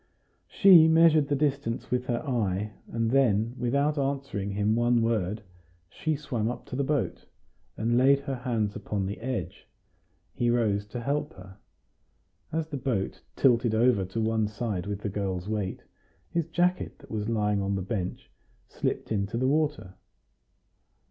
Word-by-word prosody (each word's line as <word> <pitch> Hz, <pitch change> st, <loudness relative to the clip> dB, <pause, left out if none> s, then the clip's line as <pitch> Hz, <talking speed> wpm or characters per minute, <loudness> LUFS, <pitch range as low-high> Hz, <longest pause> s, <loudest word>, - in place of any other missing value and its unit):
She 180 Hz, -5 st, +7 dB
measured 160 Hz, -2 st, +5 dB
the 145 Hz, -, +1 dB
distance 140 Hz, -4 st, -1 dB
with 125 Hz, 0 st, 0 dB
her 120 Hz, +5 st, -2 dB
eye, 105 Hz, -4 st, -1 dB, 0.2 s
and 115 Hz, -1 st, 0 dB
then, 115 Hz, -4 st, +2 dB
without 140 Hz, +5 st, +1 dB
answering 135 Hz, -8 st, -2 dB
him 105 Hz, +2 st, +1 dB
one 120 Hz, 0 st, +3 dB
word, 105 Hz, -2 st, -1 dB, 0.5 s
she 155 Hz, -1 st, -1 dB
swam 125 Hz, -7 st, -2 dB
up 120 Hz, 0 st, -6 dB
to -, -, -7 dB
the 140 Hz, -, 0 dB
boat, 145 Hz, -1 st, -2 dB, 0.5 s
and 120 Hz, +2 st, +2 dB
laid 140 Hz, +2 st, +5 dB
her 140 Hz, -2 st, -4 dB
hands 115 Hz, -5 st, -1 dB
upon 100 Hz, -2 st, -3 dB
the 100 Hz, +2 st, -5 dB
edge; 130 Hz, +1 st, -5 dB, 0.7 s
he 120 Hz, -, 0 dB
rose 105 Hz, -4 st, +1 dB
to 120 Hz, +4 st, -6 dB
help 145 Hz, +2 st, -2 dB
her 95 Hz, +1 st, -13 dB, 0.9 s
in. 160 Hz, -, -2 dB
As 160 Hz, -1 st, -2 dB
the 145 Hz, -, -4 dB
boat 120 Hz, -8 st, -2 dB
tilted 120 Hz, -3 st, +3 dB
over 115 Hz, -3 st, +3 dB
to 95 Hz, +5 st, -4 dB
one 110 Hz, -1 st, +1 dB
side 105 Hz, -3 st, -3 dB
with 100 Hz, 0 st, -4 dB
the -, -, -3 dB
girl's 95 Hz, -2 st, -3 dB
weight, 105 Hz, -3 st, -3 dB, 0.5 s
his 170 Hz, -2 st, -1 dB
jacket 180 Hz, +2 st, 0 dB
that -, -, -16 dB
was 105 Hz, 0 st, -2 dB
lying 105 Hz, -2 st, +1 dB
on 100 Hz, 0 st, -1 dB
the 95 Hz, -, -2 dB
bench 95 Hz, -3 st, -4 dB, 0.4 s
slipped -, -, -3 dB
into 100 Hz, +1 st, -1 dB
the 130 Hz, +2 st, +1 dB
water. 150 Hz, -9 st, 0 dB
115 Hz, 160 wpm, -27 LUFS, 105-140 Hz, 0.9 s, She